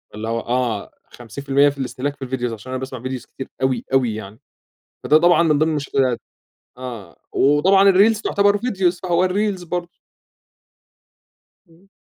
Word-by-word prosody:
اللي 110 +1 -5
هو 115 0 -1
آه 120 -3 -2 0.2
50% 140 +4 +1
في 140 - -8
الاستهلاك 135 +2 -3
في 145 - -41
ال - - -11
videos 120 -3 -2
عشان 120 +4 -9
أنا 130 - -3
باسمع 130 -2 -7
videos 130 -1 -5
كتير 130 - -8
أوي، 130 -1 0
أوي 125 -5 +2
يعني، 110 +1 -9 0.7
فده 155 - +5
طبعًا 175 +1 +4
من 155 -3 +2
ضمن 160 +1 +2
المشكلات، 135 -5 0 0.6
آه 125 -5 -8 0.2
وطبعًا 190 +8 +4
الreels 210 +3 +4
تعتبر 200 -1 +2
videos 190 -6 0
فهو 180 +1 +2
الreels 195 -1 -1
برضه. 175 0 -3 1.8
إمم. 170 +4 -24
140 Hz, 155 wpm, -20 LUFS, 125-180 Hz, 1.8 s, فده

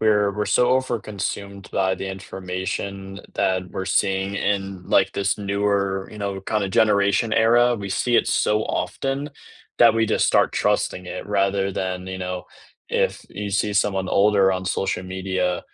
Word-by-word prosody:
we're 105 -2 +3
we're 105 - -1
so 125 0 +3
overconsumed 100 -6 -3
by 95 -1 +1
the 95 - -6
information 95 +1 -5
that 95 -1 0
we're 95 - -4
seeing 95 +1 0
in, 100 -2 -2
like, 95 0 +3
this 100 0 0
newer, 100 -1 0
you 105 - -10
know, 100 -1 -3
kinda 100 0 -1
generation 100 +2 +2
era, 120 +2 +4
we 100 -2 -6
see 120 +5 +1
it - - +3
so 105 +1 +2
often 140 +2 -2 0.5
that - - +7
we 115 0 +2
just - - +2
start - - +3
trusting 90 - 0
it, - - -6
rather 100 -1 +1
than, 95 0 -3
you 95 0 -5
know 90 -1 -4 0.4
if - - 0
you 100 +1 -5
see 105 +1 0
someone 95 -2 +1
older 100 -1 +4
on 95 0 -3
social 95 0 -1
media, 95 -1 -2
100 Hz, 160 wpm, -23 LUFS, 95-105 Hz, 0.5 s, that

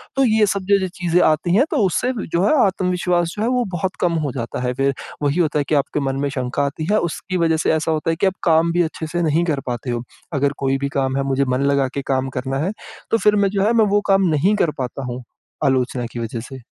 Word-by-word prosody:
तो 270 - +3
ये 220 -3 +4
सब 200 -1 -1
जो-जो 200 -2 +3
चीज़ें 175 0 +1
आती 155 +3 +2
हैं 255 +7 +5
तो - - +1
उससे 190 +8 0 0.2
जो 170 +2 0
है 215 - +3
आत्मविश्वास 180 -2 0
जो - - -2
है - - +1
वो 250 -1 +1
बहुत 185 +3 -2
कम 175 -1 +2
हो 140 - -2
जाता 115 -2 -4
है। 125 0 -1
फिर 135 +2 +1 0.3
वही 145 +4 +1
होता 155 -3 +1
है - - +1
कि 155 - +2
आपके 140 +1 0
मन 135 -2 -1
में - - 0
शंका 130 0 -2
आती 145 +3 -4
है 215 - +4
उसकी 185 +3 -4
वजह 165 -2 +2
से 160 - +1
ऐसा 160 +1 0
होता 155 +1 -1
है 165 - +1
कि 165 - 0
आप 190 - +1
काम 165 -1 +3
भी 175 +1 +2
अच्छे 160 0 -4
से 175 +2 -2
नहीं 165 0 +2
कर 155 -5 0
पाते 125 +1 -4
हो, 120 0 -3 0.3
अगर 140 0 +1
कोई 135 0 0
भी 140 +1 -2
काम 135 0 0
है 140 - 0
मुझे 135 0 +1
मन 130 0 0
लगा 140 - +3 0.2
के 140 - -2
काम 135 -1 -1
करना 130 +1 -3
है 170 +7 0 0.4
तो 225 - +4
फिर 210 -2 +3
मैं 200 -1 +3
जो 195 0 0
है 220 +3 +3
मैं 225 -2 +4
वो 205 +1 +3
काम 195 -1 +4
नहीं 165 +7 +2
कर 170 -6 +1
पाता 130 +1 -4
हूँ, 125 +1 -6 0.4
आलोचना 130 -2 +1
की 120 - -5
वजह 115 0 -4
से। 135 -1 -9
160 Hz, 270 wpm, -20 LUFS, 135-185 Hz, 0.4 s, हैं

